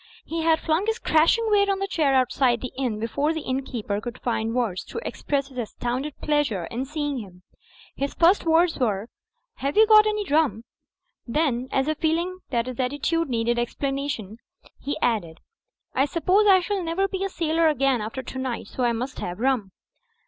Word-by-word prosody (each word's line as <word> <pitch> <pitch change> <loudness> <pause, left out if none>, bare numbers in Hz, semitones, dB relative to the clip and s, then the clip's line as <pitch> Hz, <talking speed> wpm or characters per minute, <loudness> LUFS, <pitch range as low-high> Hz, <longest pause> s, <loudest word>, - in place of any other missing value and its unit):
He 330 0 -3
had 320 0 +3
flung 325 +6 0
his 445 0 +1
crashing 325 +9 +3
weight 400 -1 +4
on 395 - +2
the 390 - -1
chair 310 -8 +1
out 255 -1 +3
side 245 -3 +2
the 255 - -6
inn 250 -5 -2
before 280 +8 0
the 320 - -3
innkeeper 255 -6 -3
cotild 240 0 -7
find 225 -1 -1
words 220 -8 -1
to - - -6
express 280 -1 -2
his 255 -2 -7
astounded 245 +5 -3
pleasure 295 - 0
in 250 +3 -3
seeing 290 -1 -3
him. 185 -4 -11 0.5
His 280 +1 -3
first 345 +4 +4
words 330 +1 +3
were 215 -3 0 0.5
"have 280 +5 -2
you 440 - +8
got 430 0 +7
any 425 -1 -1
rum?'' 290 - +1 0.6
Then, 260 -2 0
as 270 +1 +1
if 310 -1 -1
feeling 340 +3 0
that 235 -3 0
his 255 -1 -7
attitude 290 +5 0
needed 235 0 0
explana 275 +4 -2
tion, 220 -6 -5 0.4
he 285 - -3
added, 195 -9 0 0.6
"I 265 - +3
suppose 365 +8 +2
I 380 -2 +7
shall 395 +1 -2
never 345 +3 0
be 385 0 -3
a 390 - -1
sailor 330 -2 +1
again 275 -5 +2
after 225 +5 -5
tonight. 260 -1 -4
So 255 - -3
I 240 -1 +2
must 250 +4 -4
have 180 +2 -5
rum." 245 -6 0
275 Hz, 190 wpm, -24 LUFS, 240-330 Hz, 0.6 s, you